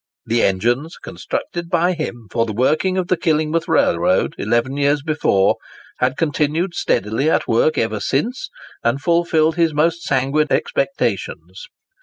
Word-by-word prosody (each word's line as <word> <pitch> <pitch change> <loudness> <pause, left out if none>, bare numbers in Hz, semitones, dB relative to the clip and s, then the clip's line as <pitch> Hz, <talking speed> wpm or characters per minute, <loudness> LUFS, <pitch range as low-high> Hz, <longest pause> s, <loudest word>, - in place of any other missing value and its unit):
The 115 +1 +1
engines 120 - 0
constructed 175 -1 -5
by 175 +1 +2
him 120 -9 -6
for 115 -1 0
the 110 - -4
working 155 - +1
of 185 -2 -1
the 185 - +2
Killingworth 160 0 0
Railroad, 85 +2 +2
eleven 120 +5 0
years 145 0 +1
before, 145 -11 +2 0.4
had 130 +2 0
continued 160 +3 0
steadily 110 - 0
at - - +1
work 120 +7 +2
ever 110 -2 0
since, 240 - -2 0.3
and 120 +4 +1
fulfilled 165 -1 +1
his 165 -3 +2
most 165 +3 +1
sanguine 135 +3 +1
expectations. - - -2
150 Hz, 140 wpm, -19 LUFS, 120-170 Hz, 0.4 s, by